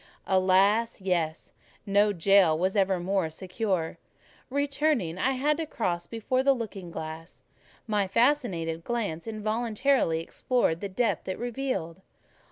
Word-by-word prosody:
Alas! 195 +5 +3
yes: 170 -5 -2 0.3
no 205 +1 +3
jail 190 -3 +4
was 185 +4 0
ever 190 -2 +2
more 185 -1 0
secure. 180 0 -3 0.5
Returning, 280 - 0
I 265 +7 +2
had 295 +4 +1
to 325 -1 -3
cross 175 - -2
before 235 +3 -1
the 275 0 +4
looking 205 -7 -6
glass; 160 +1 -8 0.4
my 210 -4 0
fascinated 195 - +1
glance 210 -7 -3
involuntarily 220 -2 0
explored 170 0 0
the 200 - -3
depth 205 -2 -1
it 185 - -3
revealed. 240 -8 -3
200 Hz, 125 wpm, -27 LUFS, 175-240 Hz, 0.5 s, jail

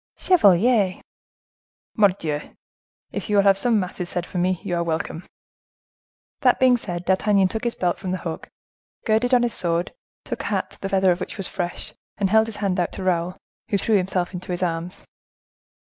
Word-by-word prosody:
"Chevalier!" 205 - +4 1.0
"Mordioux! 180 -8 0 0.6
If - - -5
you 210 - +1
will 200 - +5
have 195 -1 +4
some 230 0 +2
masses 180 -1 -4
said 175 -1 -2
for 180 - -4
me, 180 0 +1
you 195 -4 -3
are 170 - 0
welcome." 165 0 -3 1.1
That - - +3
being 255 -1 +5
said, 180 -7 -5
D'Artagnan 190 0 +3
took 220 +4 -4
his 235 - 0
belt 175 -1 -1
from 185 - -5
the 185 - -1
hook, 165 -3 -6 0.6
girded 220 +3 +2
on 245 - +3
his 235 -2 0
sword, 170 0 -1 0.3
took - - -4
a - - -7
hat - - -3
the 195 - -3
feather 190 -1 +3
of 175 - -1
which 185 - -6
was 195 - -1
fresh, 175 -2 -5 0.2
and 195 -2 0
held 220 0 +5
his 220 -2 -4
hand 185 -1 0
out 175 - 0
to 190 - -5
Raoul, 180 -1 0 0.3
who 200 - +2
threw 220 +2 +1
himself 185 -1 -1
into 180 0 -6
his 180 +1 -2
arms. 170 +1 -3
185 Hz, 190 wpm, -23 LUFS, 175-210 Hz, 1.1 s, will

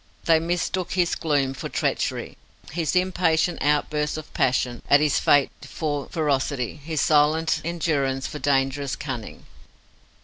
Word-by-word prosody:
They 165 -1 +5
mistook 175 +2 -2
his 175 -2 +1
gloom 140 -4 0
for - - -6
treachery, - - -2 0.4
his 165 +2 -1
impatient 175 -2 +1
outbursts 150 +1 0
of 155 - -9
passion 125 -1 0
at 140 - +7
his 150 -1 +2
fate 145 -2 +4
for 145 -3 -4
ferocity, 140 -5 -1
his 160 0 -3
silent 160 +2 +3
endurance 145 -6 -1
for 150 - -5
dangerous 135 0 0
cunning. 130 -6 -7
150 Hz, 130 wpm, -24 LUFS, 140-165 Hz, 0.4 s, at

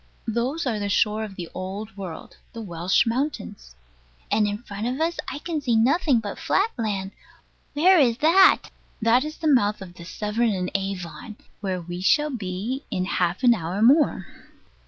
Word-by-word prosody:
Those 245 +8 -1
are 230 -5 -1
the 205 0 -2
shore 210 +2 +1
of 205 -3 -7
the 175 -2 -6
Old 195 +3 -6
World 185 -5 -8 0.2
the 230 - -7
Welsh 175 -1 +1
mountains. 230 - -3 0.6
And 210 0 +3
in 205 +3 -4
front 205 0 -5
of 255 +3 -3
us 330 +1 0
I - - -5
can 310 0 -4
see 245 -5 +1
nothing 265 +3 +3
but 205 -2 -6
flat 430 +4 +1
land. 200 -4 -3 0.6
Where 360 +4 +5
is 240 -5 +3
that? 335 +7 +5 0.3
That 230 +3 +3
is 305 +1 -6
the 320 - -2
mouth 215 -8 +3
of 185 -3 -10
the 175 - -12
Severn 210 +5 -1
and 180 -1 -3
Avon; 195 +2 -4 0.2
where 190 -3 -2
we 175 +1 -6
shall 295 +10 +3
be 220 +4 -4
in 185 - -1
half 180 +4 -1
an 245 -1 +7
hour 180 -1 -3
more. 265 - +4
215 Hz, 180 wpm, -24 LUFS, 190-260 Hz, 0.6 s, an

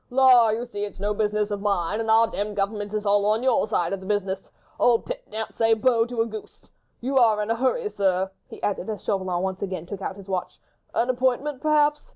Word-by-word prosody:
"La! 250 -3 +6
you 225 +3 -1
see 205 -4 -5
it's 205 -2 -6
no 205 +1 0
business 210 0 0
of 205 -1 -3
mine, 200 -1 0
and 225 -1 -2
our 225 +1 +6
demmed 210 -1 -4
government 205 +1 -2
is 215 0 -3
all 205 0 +3
on 215 +3 +1
your 255 -4 +2
side 175 -4 0
of 195 - -3
the 190 - -11
business. 195 -2 -2 0.3
Old 235 -2 +3
Pitt - - -5
daren't 220 0 -5
say 225 -1 +3
'Bo' 230 0 +2
to 240 -2 -1
a - - +2
goose. 220 -2 -10 0.3
You 265 +2 +1
are 220 -3 +4
in 210 +1 -1
a - - +2
hurry, 265 - 0
sir," 190 - 0 0.2
he - - -11
added, 200 0 -2
as 215 - -5
Chauvelin 185 -3 -1
once 190 0 -3
again 185 -4 -4
took 195 +2 -7
out 190 - -4
his 200 -1 -12
watch; 185 -2 -4 0.4
"an 245 +2 +2
appointment, 260 +2 -1
perhaps. 300 -1 +3
215 Hz, 230 wpm, -24 LUFS, 200-240 Hz, 0.4 s, La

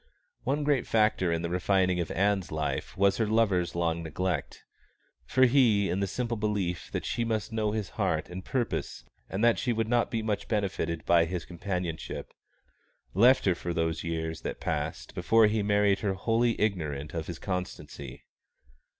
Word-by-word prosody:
One 145 +2 0
great 145 -3 +1
factor 105 -5 +2
in 85 0 -1
the 85 - -2
refining 90 0 +2
of 85 - -2
Ann's 100 -2 +1
life 75 -3 -3
was 100 0 +3
her 110 - +1
lover's 100 -6 +2
long 85 -1 0
neglect; 85 -1 -3 0.6
for 130 - +5
he, 120 -6 +4
in 95 - 0
the 100 - 0
simple 120 +3 -2
belief 100 -5 -2
that - - -3
she 120 - -1
must 110 -1 -2
know 110 -1 0
his 105 -3 -3
heart - - 0
and 90 +1 -7
purpose 120 - -2 0.3
and 100 +4 -2
that 115 -4 +4
she 125 - 0
would 115 -1 0
not 120 0 +2
be 115 -1 -2
much 105 -2 -2
benefited 95 -6 -1
by 85 -1 +5
his 85 0 -4
companionship, 90 -2 -4 0.8
left 125 +7 +5
her 95 - +4
for 85 0 -4
those 80 -1 -1
years 80 -1 -3
that - - -5
passed - - -3
before 110 +5 +4
he 105 0 +2
married 100 -1 +3
her 100 -3 -1
wholly 115 +4 +1
ignorant 75 -9 -1
of 80 -1 -4
his 85 - -5
constancy. 90 -8 -5
95 Hz, 175 wpm, -29 LUFS, 85-110 Hz, 0.8 s, for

